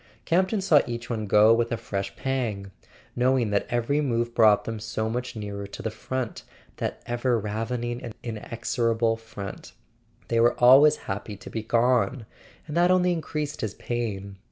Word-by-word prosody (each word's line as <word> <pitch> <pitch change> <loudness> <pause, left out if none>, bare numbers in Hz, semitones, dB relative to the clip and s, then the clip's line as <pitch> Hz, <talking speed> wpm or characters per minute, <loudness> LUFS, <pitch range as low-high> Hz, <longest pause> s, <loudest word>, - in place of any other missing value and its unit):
Campton 190 +4 +2
saw 155 -7 +5
each 120 +1 -5
one 110 -2 -2
go 105 +3 +6
with 115 0 +1
a 115 - 0
fresh 100 -2 -4
pang, 115 -8 -2 0.4
knowing 125 -3 +2
that 100 - 0
every 120 +5 +1
move 120 -4 -1
brought 110 -3 +5
them 115 -1 -5
so 110 0 -3
much 125 +1 -4
nearer 100 -2 -5
to 100 - -9
the 110 - -2
front, 125 +2 -4 0.4
that - - -4
ever 120 0 0
ravening 115 +3 -3
and 115 - -7
inexorable 115 0 -1
front. 110 -3 -9 0.5
They 115 - +1
were 120 +1 +4
always 135 +5 +7
happy 100 +1 -5
to - - -11
be 110 - -3
gone; 120 +1 +1 0.4
and 150 - -6
that 175 +1 +4
only 180 -1 +3
increased 150 -3 -4
his 105 -2 -3
pain. 100 -5 -4
115 Hz, 165 wpm, -26 LUFS, 110-130 Hz, 0.5 s, always